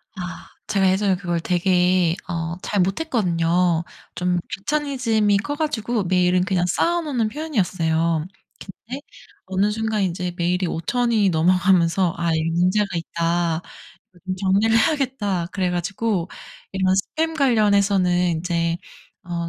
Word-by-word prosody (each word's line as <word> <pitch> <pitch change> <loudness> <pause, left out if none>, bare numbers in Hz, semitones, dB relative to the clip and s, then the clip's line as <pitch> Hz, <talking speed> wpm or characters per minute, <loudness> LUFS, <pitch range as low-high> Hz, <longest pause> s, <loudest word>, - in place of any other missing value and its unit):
아. 185 -1 -7 0.2
제가 195 -2 +2
예전에 190 0 +2
그걸 175 -2 -2
되게 180 -1 +2
어 165 -1 -3
잘 205 - -2
못했거든요. 180 - +1 0.3
좀 180 0 0
귀차니즘이 230 -5 0
커가지고 240 -5 -2
메일은 180 0 +2
그냥 185 -2 +1
쌓아 345 - +1
놓는 260 -8 -1
편이었어요. 170 - 0 0.6
근데 260 +4 -6 0.4
어느 190 +2 +1
순간 220 -1 -1
이제 180 -1 -2
메일이 180 +1 0
5,000 235 +10 -1
이 210 -4 +3
넘어가면서 180 +1 +3
'아 170 0 -1
이게 160 0 0
문제가 180 +5 +2
있다. 170 0 -1
어 - - -6 0.7
좀 185 - -1
정리를 200 +4 +2
해야겠다.' 230 - 0
그래 185 -2 0
가지고 185 +1 -1 0.4
이런 190 -1 +2 0.2
스팸 325 +1 0
관련해서는 200 - +2
이제 170 -1 -1 0.5
어 170 -1 -4
185 Hz, 285 characters per minute, -22 LUFS, 175-215 Hz, 0.7 s, 이